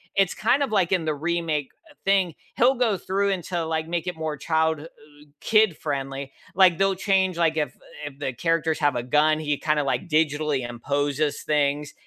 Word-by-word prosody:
it's 195 -2 +2
kind 250 +7 +2
of 265 - -3
like 190 -4 +2
in 175 -4 +1
the 155 - 0
remake, 160 -2 -2 0.2
uh, - - -18
thing, 195 -3 +2 0.2
he'll 250 +3 +4
go 235 -6 +1
through 195 +3 -1
and 185 -3 -1
to 175 0 -2
like 160 0 -2
make 170 +1 -3
it 180 - -3
more 155 -1 -3
child 160 +1 +1
h 155 - -9
ug - - -19 0.5
kid-friendly. 140 -10 0 0.2
Like 185 -3 +5
they'll 195 -1 +2
change, 190 -2 +1
like 165 -2 +2
if 150 - -1 0.3
if 140 -2 -8
the 135 -3 -2
characters 165 +3 0
have 145 -4 +2
a 120 - -2
gun, 150 +4 +3
he 150 -2 -1
kinda 150 -1 0
like 155 +6 -2
digitally 150 -4 +1
imposes 145 +4 -1
things, 145 -1 0
160 Hz, 195 wpm, -24 LUFS, 145-185 Hz, 0.5 s, Like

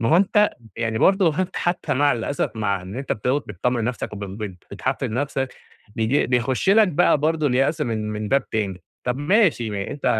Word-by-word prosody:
ما 115 - +1
هو 165 - +5
أنت 210 +2 +4 0.3
يعني 115 -1 -1
برضه 190 -6 +3
أنت 185 0 -3
حتى 175 0 -1
مع 145 +2 +3
الأسف 120 +4 -2
مع 100 -4 -1
إن 95 +5 -8
أنت 135 0 -2
بتقعُد 125 +7 0
بتطمن 115 +4 -1
نفسك 120 -3 -3
وب 100 -1 -5
بت 95 -2 -7
بتحفِّز - - -2
نفسك 135 +1 -2 0.4
بييج 115 +5 +2
بيخشّ 125 +8 +1
لك 210 0 +6
بقى 150 -2 +3
برضه 155 0 +1
اليأس 135 +5 +1
من 110 -5 -2
من 105 0 -4
باب 140 0 +1
تاني 100 -4 -2 0.2
طب 125 +2 -1
ماشي 155 - +2
ما 100 -1 -3
أ - - -6
أنت 145 -1 -8
125 Hz, 200 wpm, -22 LUFS, 110-150 Hz, 0.4 s, لك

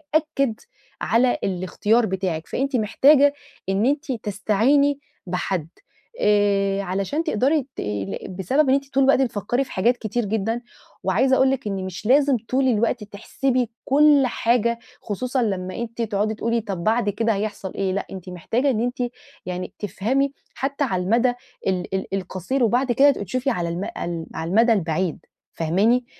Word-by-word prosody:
يأكِّد 275 -7 +1 0.4
على 245 +2 +3
الاختيار 200 +5 +1
بتاعِك. 185 -4 -2
فأنتِ 275 +1 -1
محتاجة 280 +6 +5 0.4
إن 195 +4 +1
أنتِ 285 +1 0
تستعيني 235 +7 +1 0.3
بحد 180 -2 -2 0.5
آآ، 200 -1 +2
علشان 195 - -2
تقدري 280 - +1
تقلِّ 100 -2 -3
بسبب 260 - +1
إن - - +5
أنتِ 275 0 -4
طول 270 0 +4
الوقت 270 0 +4
بتفكِّري 240 +1 0
في 265 - -13
حاجات 235 +6 +2
كتير 225 +1 -2
جدًا. 220 +3 -1 0.4
وعايزة 265 0 +3
أقول 265 0 +4
لِك 265 -5 -2
إن 195 -2 -3
مش 190 +2 -7
لازم 275 +1 +4
طول 260 +1 +2
الوقت 230 -1 +1
تحسبي 245 +4 -1 0.2
كُل 290 0 +5
حاجة، 235 0 +1 0.2
خصوصًا 245 +4 -1
لمّا 185 -3 -2
أنتِ 235 0 -5
تقعدي 215 -1 0
تقولي: 230 +1 -1
"طب، 195 -5 -5
بعد 220 -1 +2
كده 225 +2 +1
هيحصل 200 -2 -4
إيه؟" 190 -1 -1
لأ، 200 - -3
أنتِ 185 -1 -8
محتاجة 225 - -1
إن 225 -3 +1
أنتِ 245 +1 -2 0.5
يعني 180 +1 -5
تفهمي 250 +8 0 0.2
حتى 280 +2 -2
على 185 -8 -1
المدى 240 +5 +2 0.3
ال 185 0 -1
ال 190 - -4
القصير 195 +7 -2
وبعد 245 +3 +2
كده 280 +4 +6
تبقي 205 - -5
تشوفي 255 +8 -1
على 175 -8 -1
الم 175 +3 -3
ع - - -4 0.5
على 160 +1 -3
المدى 230 +4 +4
البعيد. 170 -2 -1 0.4
فاهماني؟ 210 +10 +2
225 Hz, 160 wpm, -23 LUFS, 195-260 Hz, 0.5 s, كده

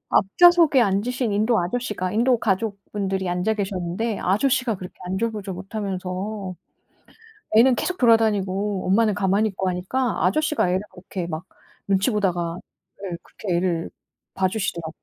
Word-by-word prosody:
앞 - - +5
좌석에 345 -5 +7
앉으신 230 +3 0
인도 220 +3 +2
아저씨가 185 0 -2
인도 240 +4 +3
가족분들이 195 -2 -2
앉아 180 +5 0
계셨는데 195 +2 -2
아저씨가 235 +4 +1
그렇게 185 -1 -9
안절부절 200 +1 -2
못하면서 190 0 -4 1.0
애는 245 +3 +6
계속 365 +7 -2
돌아다니고 205 -4 +2
엄마는 210 +3 +3
가만히 200 +2 +1
있고 190 -1 -3
하니까 210 +8 -1
아저씨가 305 - +1
애를 185 +1 +1
그렇게 180 -1 -6
막 160 0 -5 0.4
눈치 195 +4 +2
보다가 175 -5 -1 0.5
예 180 -3 -4
그렇게 185 -5 -3
애를 170 -2 -1 0.4
봐주시더라고요. 185 -4 -2
200 Hz, 355 characters per minute, -23 LUFS, 185-225 Hz, 1.0 s, 좌석에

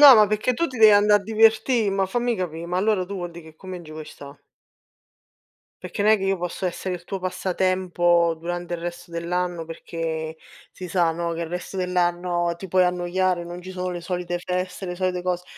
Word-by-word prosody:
No, 290 - +12
ma 210 - +7
perché 215 +4 +1
tu 335 - +1
ti 255 -6 -7
devi 220 -1 +9
andare 205 0 +5
a - - -14
divertì 225 +1 +3
ma 195 -1 +1
fammi 240 +4 0
capì, 170 -3 -4
ma 180 +1 -2
allora 195 -2 +1
tu 200 - -6
vuol 175 -2 -4
dì 170 0 -10
che 160 -1 -14
con 185 +3 -11
me 185 - -4
non 175 - -10
ci 155 - -11
vuoi 155 0 -7
sta. 140 -1 -11 1.5
Perché 205 - -3
n'è 215 +1 +6
che 195 - -4
io 195 -1 +1
posso 180 +2 -3
essere 180 +1 -3
il 175 -1 -8
tuo 195 - -4
passatempo 180 -2 +1
durante 175 +1 -4
il 170 - -5
resto 175 0 -6
dell'anno 170 0 -2
perché 160 -1 -4 0.4
si 185 - -8
sa, 170 -1 +2
no, 170 0 -2
che 165 - -4
il 165 - -2
resto 180 +2 -5
dell'anno 175 -1 0
ti 190 +2 -8
puoi 185 +1 +4
annoiare, 180 0 0
non 175 +1 -7
ci 185 +1 -9
sono 185 0 -3
le 175 - -4
solite 175 0 -3
feste, 180 +1 -3
le 180 - -3
solite 180 0 -1
cose, 180 0 -1
180 Hz, 220 wpm, -24 LUFS, 175-190 Hz, 1.5 s, No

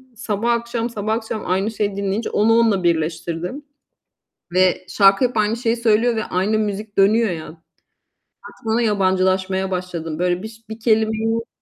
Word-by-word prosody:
sabah 225 +1 -1
akşam, 235 0 -1
sabah 215 -1 -2
akşam 220 -1 -4
aynı 195 +4 0
şeyi 205 -2 -2
dinleyince, 200 +3 -2
onu 220 +2 +3
onunla 210 -5 +2
birleştirdim. 170 - -2 0.9
Ve 185 0 +2
şarkı 195 +4 +4
hep 240 -2 -7
aynı 215 +1 +2
şeyi 235 -1 0
söylüyor 230 +1 +2
ve 220 - -1
aynı 195 +4 0
müzik 210 0 -4
dönüyor 215 +3 +4
ya. 160 -3 -5 1.0
Artık 225 +1 -1
yabancılaşmaya 190 -1 +1
başladım. 170 -3 -4
Böyle 180 +1 0
biş 220 0 -11
bir 220 +1 -8
kelimeyi 220 0 +1
210 Hz, 145 wpm, -20 LUFS, 185-225 Hz, 1.0 s, şarkı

